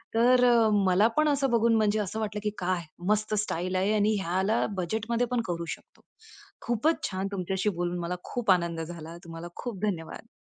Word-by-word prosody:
तर 245 +2 +5
अ, 230 -2 +4 0.2
मला 190 +4 +4
पण 305 0 +4
असं 275 -2 +1
बघून 230 0 +3
म्हणजे 215 -1 +2
असं 210 +2 -3
वाटलं 210 -1 -3
की 210 - +1
"काय, 180 -1 -1 0.3
मस्त 215 0 +1
स्टाईल 185 -1 -3
आहे" 195 +3 +2
आणि 210 +1 +2
ह्याला 190 +6 +1
बजेटमध्ये 225 +7 -1
पण 245 - +1
करू 170 -1 -3
शकतो. - - -26 0.6
खूपच 305 +8 0
छान 190 0 -3
तुमच्याशी 190 +2 -1
बोलून 175 0 -1
मला 170 +1 -2
खूप 240 -5 0
आनंद 170 -2 +1
झाला. 165 0 -8
तुम्हाला 165 +1 -7 0.2
खूप 235 -6 -5
धन्यवाद. 180 +2 -4
205 Hz, 180 wpm, -28 LUFS, 180-230 Hz, 0.6 s, तर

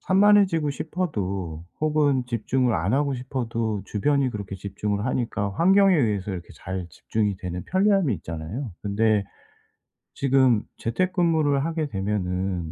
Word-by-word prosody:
산만해지고 190 -6 +4
싶어도 100 - -3 0.2
혹은 150 -4 +2
집중을 125 +1 0
안 90 +7 0
하고 140 -1 +1
싶어도 115 -5 -3
주변이 140 +5 +1
그렇게 100 -3 -6
집중을 100 +2 -3
하니까 115 -5 -1
환경에 190 - +5
의해서 105 -7 0
이렇게 90 -2 -7
잘 95 -1 -5
집중이 105 +3 -2
되는 90 -1 -5
편리함이 190 - +3
있잖아요. 80 - -6
근데 105 0 +2 0.9
지금 130 -5 +3
재택근무를 160 0 +1
하게 160 -2 -1
되면은 95 - -2
115 Hz, 320 characters per minute, -25 LUFS, 100-150 Hz, 0.9 s, 환경에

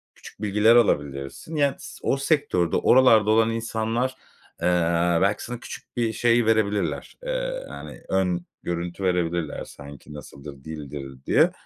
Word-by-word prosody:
küçük - - -14
bilgiler 105 +3 +4
alabilirsin. 75 - 0
Yani, 140 -2 +2
s - - -10
o 135 - +1
sektörde, 135 - +1
oralarda 115 -5 +5
olan 110 +1 +4
insanlar, 115 +3 -1 0.5
eee, - - +1 0.5
belki 100 +1 +1
sana 120 0 -6 0.4
bir 115 -2 +1
şey 120 0 +3
verebilirler. 105 -2 0
Eee, - - -3
yani - - -9
ön 90 -2 0 0.2
görüntü 85 +2 -4
verebilirler 85 -3 -1
sanki 70 0 -12
nasıldır, 70 -1 -10
değildir 70 -3 -7
diye. - - +4
105 Hz, 130 wpm, -24 LUFS, 80-120 Hz, 0.5 s, oralarda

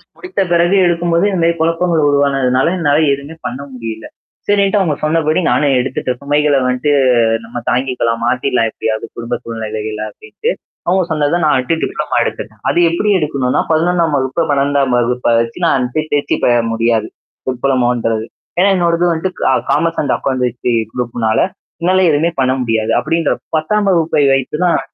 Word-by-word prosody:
முடித்த 365 +1 -6
பிறகு 175 +2 +3
இருக்கும்போது 170 +1 +1
நெறைய 170 0 +3
குழப்பங்கள் 165 -1 +1
உருவானதுனால, 135 -2 +2
என்னால 145 -4 +2 0.2
எதுவுமே 140 +3 -7
பண்ண 125 +2 -4
முடியல. 115 -3 -6 0.4
சரின்ட்டு 200 0 +2
அவங்க 165 -6 +1
சொன்னபடி 155 +1 +1
நானும் 140 -3 +2
எடுத்துட்டேன், 125 0 -2
சுமைகள 145 0 +2
வந்துட்டு 125 +3 0 0.5
நம்ம 115 +2 -6
தாங்கிக்கலாம். 125 -2 0
மாத்திடலாம் 120 -2 +1
எப்படியாவது 110 0 -3
குடும்ப 120 +1 -3
சூழ்நிலைகள 110 -1 -5
அப்படின்ட்டு, 435 +2 -4 0.4
அவங்க 185 +1 +2
சொன்னத 155 +2 +1
நான் 150 - +3
எடுத்து 130 +6 0 0.2
டிப்ளமா - - -2
எடுத்துட்டேன். - - -6
அது - - +1
எப்படி 170 +5 -1
எடுக்கணும்னா, 140 -5 0
11ஆம் 165 -1 +2
வகுப்பு, 130 +5 -1
12ஆம் 140 -2 +1
வகுப்ப 125 +1 -1 0.2
வச்சு 115 +9 -5
நான் 130 -5 +1
தே 155 - +1
தேர்ச்சி 145 -1 +1
பெற 120 - +4 0.2
முடியாது, 115 -1 +1 0.4
டிப்ளோமோன்றது. 120 -3 0 0.3
ஏன்னா, 195 +3 +5
என்னோடது 170 0 +2
வந்துட்டு 170 +3 -2
கா 130 - +4 0.2
காமர்ஸ் 165 +2 +1
அண்ட் - - +1
அக்கவுண்டன்சி 125 -2 -1 0.2
குரூப்னால, 115 -2 -1 0.4
என்னால 185 +2 +2
எதுவுமே 155 +3 +1
பண்ண 130 0 +2
முடியாது. 115 -2 0
அப்படின்றப்போ, 165 +4 -1
10ஆம் 205 +7 0
வகுப்பை 165 -4 +2
வைத்து 135 +2 -1
தான் 175 - +2
140 Hz, 145 wpm, -15 LUFS, 125-165 Hz, 0.5 s, ஏன்னா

